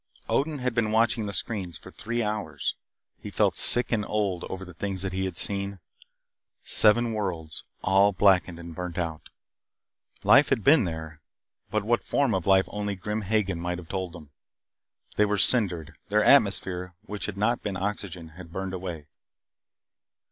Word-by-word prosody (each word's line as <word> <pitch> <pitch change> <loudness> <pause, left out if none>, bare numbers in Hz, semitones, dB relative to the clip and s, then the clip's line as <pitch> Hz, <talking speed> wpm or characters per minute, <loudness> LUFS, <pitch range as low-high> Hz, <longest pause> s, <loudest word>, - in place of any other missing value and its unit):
Odin 150 +2 0
had 125 -2 -2
been 115 -2 0
watching 110 -1 +2
the - - -3
screens 95 -2 -4
for - - -13
three 120 +2 -3
hours. 105 0 -3 0.5
He - - -8
felt - - +1
sick 120 -1 +2
and 110 -3 +1
old 100 -5 -1
over 95 0 -6
the 90 - -12
things 95 +1 -3
that 95 -1 -3
he 95 +1 -1
had 95 - -5
seen. 100 0 0 0.9
Seven 115 +2 +5
worlds 85 -7 -4 0.2
all 95 +2 +4
blackened 95 -3 +3
and 85 -1 -9
burned 90 +1 -6
out. 80 -3 -4 0.9
Life 145 - +6
had 125 -6 +1
been 140 -5 +5
there, 80 -2 -6 0.5
but 110 -1 -1
what 120 +3 +1
form 140 -5 +1
of 95 -2 -2
life 95 0 +5
only 105 -1 -3
Grim 105 +3 -3
Hagen 100 -3 0
might 90 +1 -3
have 85 -3 -11
told 95 -3 -4
them. 75 -5 -12 0.9
They 105 - +5
were 105 0 0
cindered 95 - +3
their - - +3
atmosphere, 90 -1 +3
which 105 -1 -5
had 100 -2 -6
not 115 +4 +1
been 100 -3 -4
oxygen, 95 -4 -4
had 80 +1 -13
burned 95 +1 -4
away. 90 -5 -6
95 Hz, 170 wpm, -26 LUFS, 90-105 Hz, 0.9 s, Life